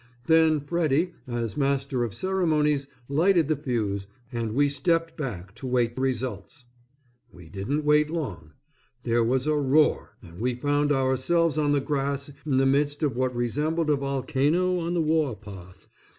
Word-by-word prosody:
Then 160 -1 +4
Freddy 165 +2 0
as 120 -2 -3
master 140 -3 0
of 110 -4 -4
ceremonies 155 -7 +1 0.2
lighted 165 +3 +3
the 155 - +3
fuse 110 -8 -2 0.2
and 115 -2 -3
we 145 +1 +4
stepped 165 +4 0
back 100 - -6
to 115 +4 -8
wait 120 -2 +1
results. 130 -1 -3 0.7
We 85 -3 -14
didn't 135 - -3
wait 150 0 +4
long. 100 - -5 0.5
There 120 0 +2
was 130 +3 +1
a 155 0 +2
roar 145 +1 +2
and 85 +2 -13
we 125 +2 0
found 145 +3 +1
ourselves 140 +5 +1
on 145 -1 +2
the 145 - +3
grass 140 0 -2 0.2
in 135 -3 +2
the 135 - +3
midst 145 +3 +1
of 140 -5 0
what 130 0 -1
resembled 150 +7 0
a - - +4
volcano 145 +6 0
on 170 +1 -2
the 170 - +2
war 155 -5 +1
path. 95 -3 -13
140 Hz, 160 wpm, -26 LUFS, 120-155 Hz, 0.7 s, Then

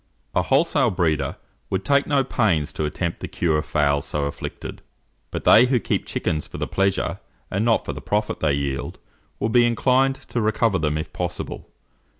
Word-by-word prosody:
A 90 - +3
wholesale 135 - +3
breeder 80 -8 0 0.3
would 95 0 -2
take 140 0 +3
no 140 -2 +3
pains 95 - +1
to 75 - -2
attempt 85 +3 -3
the - - -5
cure 80 -3 0
of 75 - -5
fowls 70 -2 +2
so 75 -1 -1
afflicted; 70 - -6 0.5
but - - -5
they 120 +3 +7
who 125 -1 +2
keep - - -2
chickens 75 -1 -2
for - - -8
the - - -2
pleasure, 95 0 0 0.3
and 100 +3 0
not 115 -1 +2
for - - -3
the - - -8
profit 105 +1 -1
they 75 -3 +2
yield, 70 -1 -3 0.4
will 110 - 0
be 120 +2 +5
inclined 130 +3 +3
to 120 - -4
recover 110 -2 +2
them 75 -1 0
if 80 - -5
possible. - - -5
95 Hz, 185 wpm, -23 LUFS, 75-120 Hz, 0.5 s, they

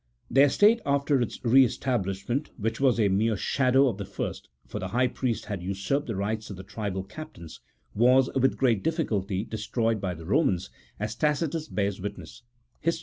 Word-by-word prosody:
Their 140 +2 +6
state 215 - +4
after 140 -1 +1
its 120 - -3
re 130 +3 +7
establishment 120 +2 -1
(which 115 0 -2
was 130 -4 +3
a 105 - +4
mere 105 +3 +1
shadow 130 +4 +3
of 110 -5 -2
the 100 - -4
first, 100 - -5 0.2
for - - -6
the - - -3
high 125 +2 +1
priests 125 -4 -2
had 100 -4 -4
usurped 100 +10 -2
the 115 - -3
rights 110 +3 -2
of 100 - -6
the 95 - -8
tribal 100 -1 -4
captains) 100 - -10 0.3
was, 125 +4 +5
with 135 0 +2
great 115 -7 +2
difficulty, 105 - -1
destroyed 110 0 -1
by 90 -2 -2
the 80 0 -10
Eomans, 95 - +1 0.3
as 105 +1 -2
Tacitus 155 +3 0
bears 100 -5 -2
witness 100 +1 -7 0.4
(Hist. 165 +2 0
115 Hz, 180 wpm, -27 LUFS, 100-135 Hz, 0.4 s, re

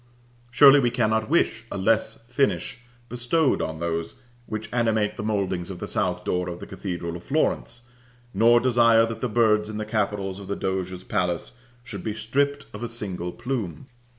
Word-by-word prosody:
Surely 140 +3 +8
we 125 -3 +2
cannot 110 -2 0
wish 130 -8 +2
a - - -3
less 110 +3 +1
finish 120 -2 0 0.3
bestowed 125 +6 +1
on 80 0 -3
those 85 0 -3 0.3
which 110 -1 -4
animate 110 -3 +1
the - - -5
mouldings 95 -4 -1
of 95 - -6
the 100 - -6
south 90 -3 -1
door 90 0 -1
of 85 - -5
the - - -8
cathedral 85 -3 -5
of 85 - -7
Florence; 135 - -1 0.5
nor 115 +4 +5
desire 115 -2 +5
that 115 0 -6
the 125 - -1
birds 105 -2 +3
in 110 - -5
the 110 - -3
capitals 100 -3 -2
of 100 - -9
the 100 - -2
Doge's 95 -1 -3
palace 90 -4 -1 0.3
should 100 -6 -7
be 110 -1 -3
stripped 140 +6 0
of 105 - -8
a 120 - -2
single 95 -6 -4
plume. 120 -2 -4
110 Hz, 180 wpm, -25 LUFS, 95-120 Hz, 0.5 s, Surely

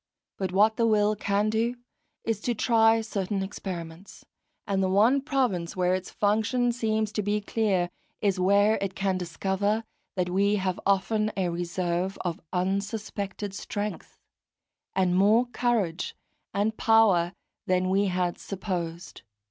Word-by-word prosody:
But 190 -2 -1
what 210 +4 +4
the 230 - +3
will 210 -1 +3
can 205 +1 0
do 230 +2 0 0.5
is 225 -3 -1
to 240 +1 -1
try 225 0 +4
certain 200 -2 -2
experiments, 180 -2 -7 0.4
and 195 -1 0
the 190 - +1
one 225 +8 +4
province 250 - -1
where 180 -1 +2
its 185 0 -2
function 220 +4 +1
seems 220 -2 -1
to 215 - -1
be 205 +1 0
clear, 200 -4 0 0.3
is 195 -3 +1
where 200 +3 +4
it 195 -1 -3
can 190 -1 0
discover 195 +5 -1 0.3
that 180 -1 -1
we 200 +3 +3
have 185 -2 -1
often 215 +2 +2
a 185 -2 +1
reserve 175 +2 -2
of 175 -3 -3
unsuspected 200 +1 -2
strength, 205 +1 -5 0.8
and 185 -2 +2
more 210 +6 +5
courage 235 -8 -1 0.4
and 210 +2 0
power 200 -6 +4 0.3
than 185 0 +2
we 195 +2 +2
had 180 -1 -1
supposed. 180 -3 -5
200 Hz, 140 wpm, -27 LUFS, 185-215 Hz, 0.8 s, more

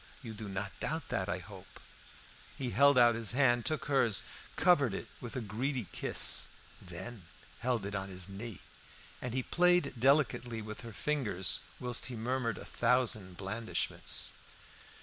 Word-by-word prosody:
You 115 -3 -6
do 105 -1 -7
not 95 +1 -3
doubt 160 -1 -3
that, 95 - -1
I 90 - 0
hope?" 95 +1 -12 0.8
He 130 -3 -3
held 140 +5 +5
out 120 -1 +7
his 115 0 0
hand, 120 -3 +3
took 155 -1 -1
hers, 135 -8 +3 0.3
covered 145 - +4
it - - -6
with 120 - -7
a 130 - -2
greedy 120 +4 -2
kiss, - - +2 0.3
then 95 +5 -8 0.4
held 120 -4 0
it 100 - -4
on 95 -1 -3
his 90 -2 -2
knee; 100 +2 -7 0.6
and 125 - -3
he 130 - 0
played 180 -2 +3
delicately 125 -3 +2
with 110 0 -7
her 115 -1 -8
fingers 105 - +1 0.2
whilst 125 -1 +1
he 125 - -5
murmured 120 +1 -1
a - - -9
thousand 115 -7 +2
blandishments. 105 +4 -1
115 Hz, 155 wpm, -33 LUFS, 100-130 Hz, 0.8 s, out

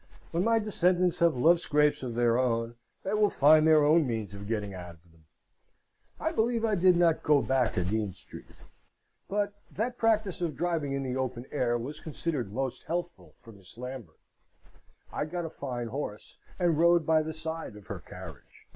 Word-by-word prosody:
When 170 +2 0
my 230 +1 +3
descendants 185 -4 +1
have 170 -4 +4
love 165 +7 +5
scrapes 150 -2 +2
of 125 -3 -5
their 120 -1 +3
own, 115 -2 0 0.3
they 195 - -2
will 210 -1 +3
find 155 0 +5
their 155 -2 +6
own 155 0 +4
means 110 -5 -3
of 100 0 -8
getting 105 -3 -2
out 90 -2 -8
of 85 +1 -26
them. 80 -1 -25 0.9
I - - -1
believe 230 0 +1
I 220 - +1
did 180 -2 +4
not 170 -2 +3
go 150 -1 +4
back 130 -3 +1
to 90 - +1
Dean 105 +2 -1
Street, 90 - -10 0.7
but 205 0 -1 0.2
that 240 +4 -3
practice 215 -5 +1
of 165 -5 -1
driving 160 -3 -1
in 140 0 -2
the 130 -1 -3
open 130 -2 -3
air 120 -4 +1
was 130 +6 -6
considered 150 -8 -4
most 130 +3 -3
healthful 175 +1 -4
for 115 - -15
Miss 95 -1 -16
Lambert. 125 -1 -8 1.0
I - - -1
got 175 +2 -4
a 160 - -6
fine 125 -6 -5
horse, 115 -5 -6 0.2
and 170 -4 +2
rode 170 -1 +4
by 160 0 +4
the 155 +1 -4
side 160 -6 -6
of 105 -2 -13
her - - -6
carriage. - - -12
150 Hz, 190 wpm, -29 LUFS, 120-175 Hz, 1.0 s, their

